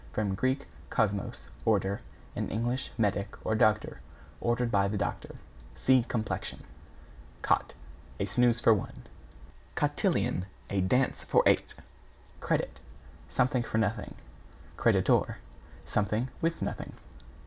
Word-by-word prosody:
From 100 -3 0
Grk. 130 +6 +1 0.3
kosmos, 105 -4 -1
order, 100 -2 +1 0.3
and - - -2
Eng. 120 +3 0 0.2
medic, 105 -3 0
or - - +1
doctor, 110 0 +2 0.4
ordered 120 0 +1
by 100 -2 +3
the 105 +1 -1
doctor. 100 - -3 0.4
(See 130 -1 +4
Complexion.) 115 -3 -3 0.8
=COT= - - +1 0.4
A 100 - +1
snooze 120 +4 +3
for 115 - +6
one. 105 - -4 0.7
=COTILLON= 90 - +1 0.2
A 100 -1 +1
dance 125 +8 +1
for - - +4
eight. - - +3 0.6
=CREDIT= - - -1 0.5
Something 130 -1 +2
for 115 -2 -2
nothing. 110 0 -1 0.6
=CREDITOR= - - +3 0.5
Something 105 +5 0
with 165 0 0
nothing. - - -4
110 Hz, 115 wpm, -30 LUFS, 100-120 Hz, 0.8 s, for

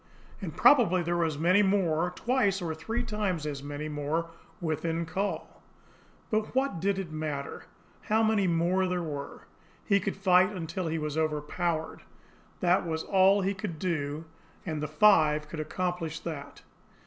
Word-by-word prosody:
And - - -6
probably 195 -11 +5
there 170 +1 -1
were 170 - +2
as 155 -3 -2
many 180 +6 +4
more, 180 -4 +2
twice 235 -5 +1
or 170 -3 -3
three 225 +10 -3
times 205 -8 -2
as 145 -2 -4
many 145 +1 -5
more 155 +3 -2 0.3
within 165 0 -1
call. 190 +5 -4 0.7
But 215 +2 -1
what 265 -8 +1
did 195 +2 +1
it 190 -5 -4
matter 155 -3 -4 0.4
how 220 +1 +2
many 215 -3 +2
more 175 +2 +2
there 180 -1 -1
were! 145 -3 -6 0.4
He 200 -2 +3
could 195 - -3
fight 185 -1 +5
until 175 -1 -4
he 160 0 -1
was 150 0 -2
overpowered, 155 +2 -2 0.6
that 180 +1 +3
was 160 -2 -3
all 195 +1 +4
he 195 +1 0
could 195 -5 -5
do, 155 -3 -2 0.4
and 155 -4 -3
the 150 - -2
five 155 -3 +4
could 155 +1 -7
accomplish 165 0 -3
that. 145 -4 -7
170 Hz, 160 wpm, -29 LUFS, 155-195 Hz, 0.7 s, probably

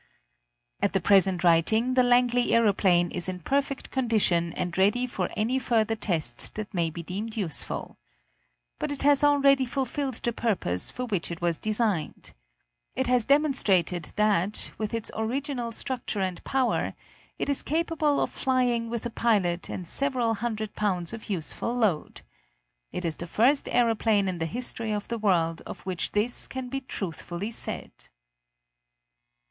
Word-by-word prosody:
At 200 - +1
the 195 - +2
present 190 -1 +3
writing 220 +9 +3
the 255 - +5
Langley 245 0 +3
aeroplane 190 -6 +3
is 180 +1 -3
in 185 -1 -4
perfect 275 - -1
condition 210 -9 +2
and 175 -1 -3
ready 205 +6 +3
for 250 - -3
any 240 +5 +1
further 225 -3 +1
tests 160 - 0
that 215 -1 -7
may 170 -3 +1
be 170 +2 -7
deemed 210 +6 -5
useful. 180 -9 -2 0.8
But - - -2
it 285 - -3
has 290 0 +4
already 280 -2 +5
fulfilled 265 +1 -2
the 235 0 -1
purpose 185 - 0
for 250 - -4
which 200 -8 -2
it 170 0 -5
was 170 -2 0
designed. 215 -6 -1 0.6
It 260 - 0
has 250 -3 +2
demonstrated 205 - +2
that, 210 -2 +2
with 215 -1 -2
its 230 -1 -3
original 245 +2 -2
structure 240 -3 -3
and 185 -2 -3
power, 265 -2 0 0.4
it - - -2
is 280 -1 +2
capable 310 -2 0
of - - -1
flying 245 -3 0
with 235 -1 -4
a 240 - -3
pilot 195 -8 +1
and 180 - -5
several 255 -1 0
hundred 215 -1 -3
pounds 185 -3 -1
of 225 -1 -8
useful 195 +6 -2
load. 210 -10 0 0.7
It 180 - -4
is 160 -2 -1
the 170 - -6
first 255 - +2
aeroplane 225 -4 +2
in 180 -2 -3
the 165 - -1
history 230 +1 -3
of 205 -1 -4
the 235 -1 -2
world 170 -6 +1
of - - -8
which 185 -2 -3
this 215 +4 -1
can 260 -1 -6
be 270 +1 -3
truthfully 190 -2 -5
said. - - -4
220 Hz, 155 wpm, -27 LUFS, 185-250 Hz, 0.8 s, the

